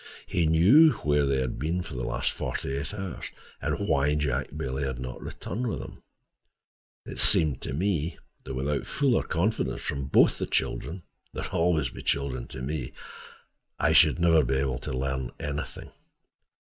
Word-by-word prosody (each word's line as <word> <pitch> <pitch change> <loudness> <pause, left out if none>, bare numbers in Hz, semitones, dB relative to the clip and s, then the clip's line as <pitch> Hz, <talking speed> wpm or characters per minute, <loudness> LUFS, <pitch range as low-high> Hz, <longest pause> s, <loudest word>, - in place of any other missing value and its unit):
He 85 -2 +1
knew 110 - +7
where 75 -1 +3
they 70 -1 +1
had 65 -2 -3
been 85 +6 -1
for 80 - -9
the 60 - -4
last - - -1
forty 70 - -3
eight 70 0 -3
hours, 95 -4 -5 0.3
and - - -1
why 70 +2 +2
Jack 75 -4 0
Bailey 65 +1 -3
had 65 -2 -2
not 65 0 -6
returned 120 +7 -4
with 110 - -2
him. - - -9 1.0
It - - -7
seemed 75 -5 +4
to - - -4
me 85 -1 -1 0.3
that 65 - -6
without 70 +2 -1
fuller 135 -4 +2
confidence 95 +6 -1
from 70 -1 -3
both 65 - +4
the - - -2
children—they 85 +1 -4
are - - -4
always 80 -3 +1
children 70 -3 -2
to 65 - -8
me—I 70 -2 -5
should 75 -2 +6
never 85 -2 +4
be 65 +1 0
able 65 -1 0
to - - -6
learn 65 -1 -2
anything. 75 0 -5
75 Hz, 160 wpm, -27 LUFS, 65-85 Hz, 1.0 s, knew